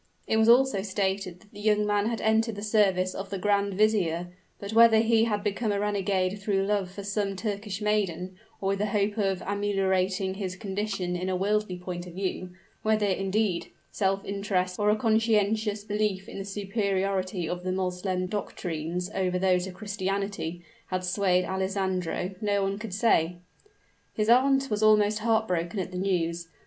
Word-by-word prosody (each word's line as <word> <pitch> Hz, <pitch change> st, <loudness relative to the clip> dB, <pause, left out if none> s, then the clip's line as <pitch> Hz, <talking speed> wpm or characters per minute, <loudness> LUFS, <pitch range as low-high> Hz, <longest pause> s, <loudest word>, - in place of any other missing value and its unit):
It 220 Hz, -, +1 dB
was 220 Hz, +1 st, +4 dB
also 245 Hz, -4 st, +5 dB
stated 190 Hz, -2 st, -2 dB
that 215 Hz, -, -22 dB
the 205 Hz, -, -12 dB
young 210 Hz, 0 st, +2 dB
man 205 Hz, 0 st, +1 dB
had 230 Hz, -1 st, -2 dB
entered 220 Hz, 0 st, +2 dB
the 205 Hz, -, -6 dB
service 195 Hz, -4 st, +2 dB
of 195 Hz, 0 st, -6 dB
grand 200 Hz, 0 st, +1 dB
vizier; 180 Hz, -5 st, +1 dB, 0.3 s
but 200 Hz, +2 st, -6 dB
whether 230 Hz, 0 st, +7 dB
he 225 Hz, 0 st, +4 dB
had 210 Hz, -3 st, -1 dB
become 210 Hz, +1 st, -1 dB
a 200 Hz, -, 0 dB
renegade 200 Hz, -1 st, 0 dB
through 195 Hz, -1 st, +1 dB
love 200 Hz, -2 st, 0 dB
for 200 Hz, +2 st, -8 dB
some 200 Hz, 0 st, -1 dB
Turkish 205 Hz, 0 st, -4 dB
maiden, 190 Hz, -4 st, 0 dB, 0.2 s
or 195 Hz, -, -1 dB
with 195 Hz, 0 st, 0 dB
the 210 Hz, -, +1 dB
hope 205 Hz, +1 st, 0 dB
of 195 Hz, -2 st, 0 dB
ameliorating 195 Hz, -2 st, 0 dB
his 190 Hz, -2 st, -4 dB
condition 195 Hz, -3 st, -3 dB
in 180 Hz, +1 st, -2 dB
a 185 Hz, -, 0 dB
worldly 205 Hz, 0 st, 0 dB
point 180 Hz, 0 st, -6 dB
of 175 Hz, -, -10 dB
view, 185 Hz, -1 st, -3 dB, 0.3 s
whether, 215 Hz, -1 st, +2 dB
indeed, 195 Hz, -1 st, 0 dB, 0.2 s
self 195 Hz, -1 st, 0 dB
interest 195 Hz, -2 st, -1 dB
or 210 Hz, 0 st, +3 dB
a 210 Hz, -, +4 dB
conscientious 215 Hz, -2 st, +1 dB
belief 205 Hz, -2 st, -1 dB
in -, -, -7 dB
the 195 Hz, -, -5 dB
superiority 195 Hz, -3 st, -1 dB
of 175 Hz, +1 st, -4 dB
the 185 Hz, -, -1 dB
Moslem 185 Hz, 0 st, -1 dB
doctrines 180 Hz, -2 st, -4 dB
over 185 Hz, -1 st, 0 dB
those 180 Hz, 0 st, +2 dB
of 185 Hz, -, -8 dB
Christianity, 195 Hz, -3 st, -3 dB, 0.2 s
had 185 Hz, -1 st, -2 dB
swayed 180 Hz, 0 st, +2 dB
Alessandro, 190 Hz, -1 st, -2 dB
no 205 Hz, -2 st, +1 dB
one 195 Hz, +1 st, -1 dB
could 210 Hz, -4 st, -5 dB
say. 180 Hz, -6 st, +2 dB, 0.8 s
His 215 Hz, 0 st, 0 dB
aunt 270 Hz, +2 st, +4 dB
was 210 Hz, 0 st, 0 dB
almost 215 Hz, 0 st, +4 dB
heart 220 Hz, 0 st, +2 dB
broken 175 Hz, +2 st, -2 dB
at 185 Hz, 0 st, -3 dB
the 180 Hz, -, -5 dB
news. 170 Hz, -3 st, -1 dB
195 Hz, 175 wpm, -27 LUFS, 185-210 Hz, 0.8 s, whether